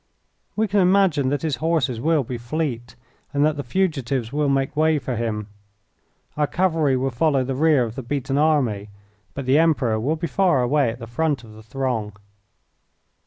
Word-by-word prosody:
We 220 Hz, +1 st, +1 dB
can 205 Hz, +1 st, +1 dB
imagine 180 Hz, -7 st, +3 dB
that 145 Hz, +3 st, -2 dB
his 150 Hz, -5 st, -1 dB
horses 135 Hz, -6 st, 0 dB
will 155 Hz, 0 st, +2 dB
be 120 Hz, 0 st, -6 dB
fleet, 120 Hz, -2 st, -4 dB, 0.4 s
and 145 Hz, 0 st, +2 dB
that 155 Hz, -1 st, +1 dB
the 145 Hz, -, -3 dB
fugitives 135 Hz, -6 st, -1 dB
will 150 Hz, -1 st, +1 dB
make 135 Hz, +1 st, 0 dB
way 155 Hz, 0 st, +3 dB
for 125 Hz, -2 st, -3 dB
him. 110 Hz, -2 st, -2 dB, 0.9 s
Our 150 Hz, -1 st, +1 dB
cavalry 160 Hz, -7 st, +1 dB
will 135 Hz, +1 st, -1 dB
follow 135 Hz, +1 st, +1 dB
the 135 Hz, +1 st, -3 dB
rear 145 Hz, -1 st, +3 dB
of 115 Hz, -2 st, -4 dB
the 135 Hz, -, -6 dB
beaten 135 Hz, +2 st, -2 dB
army, 130 Hz, -10 st, +1 dB, 0.5 s
but 140 Hz, -, -5 dB
the 135 Hz, +4 st, +4 dB
Emperor 140 Hz, -9 st, +2 dB
will 140 Hz, +8 st, 0 dB
be 165 Hz, +2 st, -4 dB
far 170 Hz, -7 st, +2 dB
away 135 Hz, 0 st, +2 dB
at 115 Hz, -, -5 dB
the 115 Hz, -, -8 dB
front 140 Hz, +2 st, -1 dB
of 110 Hz, -2 st, -13 dB
the 110 Hz, -, -13 dB
throng." 115 Hz, -3 st, -3 dB
135 Hz, 185 wpm, -22 LUFS, 120-155 Hz, 0.9 s, the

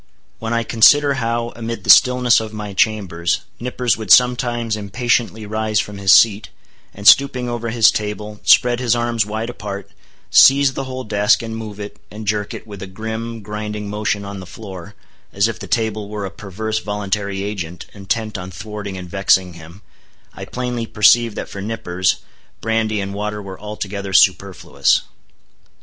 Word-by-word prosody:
When 115 Hz, 0 st, -4 dB
I 115 Hz, 0 st, +1 dB
consider 140 Hz, +6 st, +5 dB
how, 115 Hz, +1 st, -2 dB
amid 115 Hz, 0 st, -5 dB
the -, -, +7 dB
stillness 125 Hz, -1 st, +5 dB
of 110 Hz, -1 st, -6 dB
my 105 Hz, -2 st, -6 dB
chambers, 95 Hz, -5 st, 0 dB, 0.2 s
Nippers 125 Hz, 0 st, -1 dB
would 110 Hz, -, -7 dB
sometimes 120 Hz, -2 st, +3 dB
impatiently 110 Hz, +1 st, -1 dB
rise 110 Hz, 0 st, -1 dB
from 105 Hz, -1 st, -4 dB
his 95 Hz, -1 st, +3 dB
seat, 105 Hz, -2 st, +5 dB, 0.4 s
and 100 Hz, +1 st, -4 dB
stooping 130 Hz, -3 st, +5 dB
over 120 Hz, -1 st, -3 dB
his 115 Hz, -1 st, +5 dB
table, 105 Hz, 0 st, -5 dB
spread 120 Hz, -1 st, +4 dB
his 120 Hz, -2 st, +1 dB
arms 120 Hz, -3 st, 0 dB
wide 110 Hz, +3 st, -4 dB
apart, 100 Hz, -3 st, -7 dB, 0.4 s
seize 135 Hz, 0 st, +6 dB
the 135 Hz, -, -4 dB
whole 130 Hz, 0 st, -6 dB
desk, 105 Hz, +1 st, +2 dB
and 110 Hz, 0 st, -5 dB
move 110 Hz, -2 st, -7 dB
it, 105 Hz, 0 st, -8 dB
and 105 Hz, +1 st, -9 dB
jerk 105 Hz, 0 st, -2 dB
it, -, -, -9 dB
with 100 Hz, -3 st, -10 dB
a 95 Hz, -, -6 dB
grim, 110 Hz, +3 st, -6 dB
grinding 105 Hz, 0 st, -5 dB
motion 105 Hz, -1 st, -2 dB
on 100 Hz, 0 st, -7 dB
the 95 Hz, -, -10 dB
floor, 95 Hz, -3 st, -10 dB, 0.4 s
as 100 Hz, +2 st, +2 dB
if 115 Hz, -, -5 dB
the -, -, -8 dB
table 110 Hz, -3 st, -1 dB
were 105 Hz, -1 st, -4 dB
a 95 Hz, -, -6 dB
perverse 110 Hz, +3 st, -4 dB
voluntary 100 Hz, -1 st, -3 dB
agent, 90 Hz, -5 st, -5 dB
intent 105 Hz, +1 st, -3 dB
on 90 Hz, 0 st, -7 dB
thwarting 105 Hz, 0 st, -7 dB
and 90 Hz, -1 st, -8 dB
vexing 95 Hz, -1 st, +2 dB
him; 85 Hz, +4 st, -14 dB, 0.5 s
I -, -, -8 dB
plainly 125 Hz, -2 st, -4 dB
perceive 115 Hz, +1 st, +4 dB
that -, -, -5 dB
for 100 Hz, -, -8 dB
Nippers, 95 Hz, -4 st, -1 dB, 0.4 s
brandy 110 Hz, -1 st, -1 dB
and 100 Hz, 0 st, -5 dB
water 105 Hz, +1 st, -4 dB
were 95 Hz, -2 st, -9 dB
altogether 100 Hz, -2 st, -6 dB
superfluous. -, -, +2 dB
105 Hz, 170 wpm, -19 LUFS, 100-115 Hz, 0.5 s, the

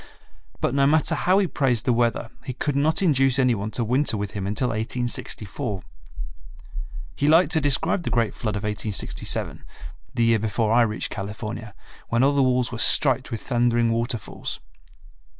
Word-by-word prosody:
But -, -, 0 dB
no 140 Hz, 0 st, +3 dB
matter 155 Hz, +1 st, +2 dB
how 185 Hz, +2 st, +2 dB
he 200 Hz, -, +3 dB
praised 130 Hz, -9 st, 0 dB
the 125 Hz, -, +3 dB
weather 115 Hz, -1 st, 0 dB
he 130 Hz, -, -5 dB
could 145 Hz, +3 st, -2 dB
not 155 Hz, +7 st, +2 dB
induce 135 Hz, -6 st, +3 dB
any 125 Hz, -2 st, +3 dB
one 105 Hz, -1 st, -3 dB
to 120 Hz, -, 0 dB
winter 125 Hz, +1 st, +1 dB
with 100 Hz, -1 st, -4 dB
him 100 Hz, -2 st, -4 dB
until 110 Hz, +5 st, -1 dB
1864. 110 Hz, -2 st, -3 dB, 1.3 s
He 145 Hz, -, 0 dB
liked 165 Hz, +1 st, +5 dB
to 160 Hz, -, +2 dB
describe 155 Hz, +6 st, +1 dB
the -, -, -3 dB
great 115 Hz, -3 st, 0 dB
flood 110 Hz, -3 st, -4 dB
of 100 Hz, -, -4 dB
1867, 105 Hz, -1 st, -3 dB, 0.5 s
the 120 Hz, -, +2 dB
year 115 Hz, -1 st, +3 dB
before 110 Hz, +1 st, 0 dB
I 120 Hz, -, +5 dB
reached 110 Hz, -2 st, -1 dB
California, 105 Hz, +1 st, -6 dB, 0.3 s
when 115 Hz, +2 st, +2 dB
all 140 Hz, +1 st, +4 dB
the 140 Hz, -, +2 dB
walls 125 Hz, -2 st, +2 dB
were 120 Hz, -, -5 dB
striped 130 Hz, 0 st, +4 dB
with 115 Hz, -4 st, -5 dB
thundering 120 Hz, -2 st, +1 dB
waterfalls. 115 Hz, 0 st, -3 dB
120 Hz, 170 wpm, -24 LUFS, 110-140 Hz, 1.3 s, liked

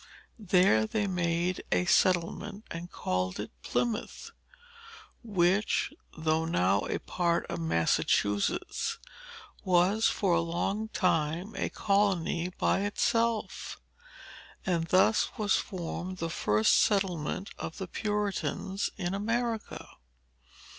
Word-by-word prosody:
There 180 Hz, -, +4 dB
they 210 Hz, -, 0 dB
made 175 Hz, -1 st, -1 dB
a 90 Hz, 0 st, +2 dB
settlement, 185 Hz, -, +1 dB
and 170 Hz, +1 st, -6 dB
called 90 Hz, +1 st, -2 dB
it 105 Hz, -, -5 dB
Plymouth; 240 Hz, -, -2 dB, 0.9 s
which, 195 Hz, -2 st, +1 dB, 0.2 s
though 160 Hz, 0 st, +1 dB
now 95 Hz, -, +2 dB
a -, -, -1 dB
part 170 Hz, -1 st, 0 dB
of 170 Hz, -, -3 dB
Massachusetts, 100 Hz, -, 0 dB, 0.7 s
was 185 Hz, +4 st, +3 dB
for 190 Hz, -4 st, +1 dB
a 170 Hz, -, +3 dB
long 185 Hz, +6 st, -2 dB
time 175 Hz, 0 st, 0 dB
a -, -, -1 dB
colony 190 Hz, -4 st, +1 dB
by -, -, +2 dB
itself. 230 Hz, +2 st, -1 dB, 0.9 s
And 170 Hz, -3 st, 0 dB
thus 190 Hz, +5 st, +3 dB
was 210 Hz, -2 st, +2 dB
formed 185 Hz, 0 st, -5 dB
the 165 Hz, -1 st, -3 dB
earliest 105 Hz, +1 st, +4 dB
settlement 190 Hz, -3 st, 0 dB
of 160 Hz, -, -6 dB
the 190 Hz, -, -5 dB
Puritans 200 Hz, -1 st, -2 dB
in 180 Hz, -2 st, -2 dB
America. 230 Hz, +2 st, -2 dB
180 Hz, 105 wpm, -29 LUFS, 165-205 Hz, 0.9 s, There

